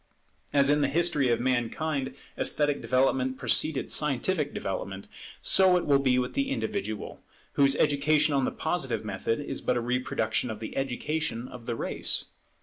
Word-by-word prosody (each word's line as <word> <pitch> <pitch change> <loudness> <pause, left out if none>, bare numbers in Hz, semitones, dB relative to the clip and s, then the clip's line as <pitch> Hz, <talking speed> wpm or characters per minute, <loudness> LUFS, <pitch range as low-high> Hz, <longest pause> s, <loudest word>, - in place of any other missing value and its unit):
As 140 0 +4
in 145 0 +3
the 140 - +3
history 150 -3 +2
of 120 - +2
mankind 130 +3 -1 0.2
esthetic 145 -1 0
development 130 +2 +1
preceded 155 +1 +1
scientific 150 +2 +1
development, 95 0 -5 0.4
so 185 -1 +5
it 175 - -2
will 140 -2 +4
be 130 -2 +2
with 125 0 -1
the 275 -1 -1
individual, 200 - -4 0.3
whose 140 0 +4
education 150 +1 +2
on 135 -1 +2
the - - +1
Positive 135 -10 -2
method 105 +3 -2
is 145 - -4
but 125 - 0
a - - +1
reproduction 120 -2 -1
of 110 - -5
the 110 - -7
education 135 -1 -2
of 120 -2 -11
the 120 - -1
race. - - -1
135 Hz, 160 wpm, -28 LUFS, 120-150 Hz, 0.4 s, so